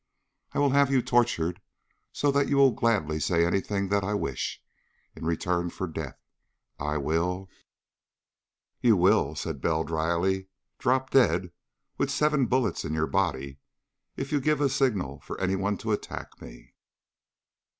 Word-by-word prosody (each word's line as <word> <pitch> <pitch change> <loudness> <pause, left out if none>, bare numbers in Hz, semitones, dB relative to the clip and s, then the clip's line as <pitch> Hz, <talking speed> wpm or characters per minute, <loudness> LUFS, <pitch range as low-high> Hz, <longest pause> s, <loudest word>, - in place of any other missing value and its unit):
I - - -4
will 145 -1 +3
have 140 0 +4
you 130 -3 +2
tortured 100 -7 +1 0.5
so 145 - +1
that 140 0 +1
you 140 - +2
will 135 -1 +6
gladly 100 -11 0
say 85 +2 +2
anything 100 +2 -1
that 100 0 +1
I 105 +2 -1
wish, 70 -10 -3 0.6
in 80 - -6
return 85 +1 0
for 95 - -4
death. 80 - -6 0.6
I 75 +1 -1
will 90 +6 -1 0.6
" - - -62
"You 115 -4 +5
will," 90 -5 +3
said 75 -2 -4
Bell 80 -1 +1
dryly, 85 +4 0 0.3
"drop 130 +1 +1
dead 90 -9 +3 0.5
with - - +1
seven 150 -4 +2
bullets 125 -4 0
in 75 - -3
your 80 0 +1
body 70 -8 -1 0.6
if 135 - -4
you 145 -2 +1
give 150 +1 +2
a 145 -1 +3
signal 110 - 0
for - - -7
anyone 95 +2 0
to 110 - -3
attack 105 - -5
me." - - -13
95 Hz, 150 wpm, -27 LUFS, 80-125 Hz, 0.6 s, will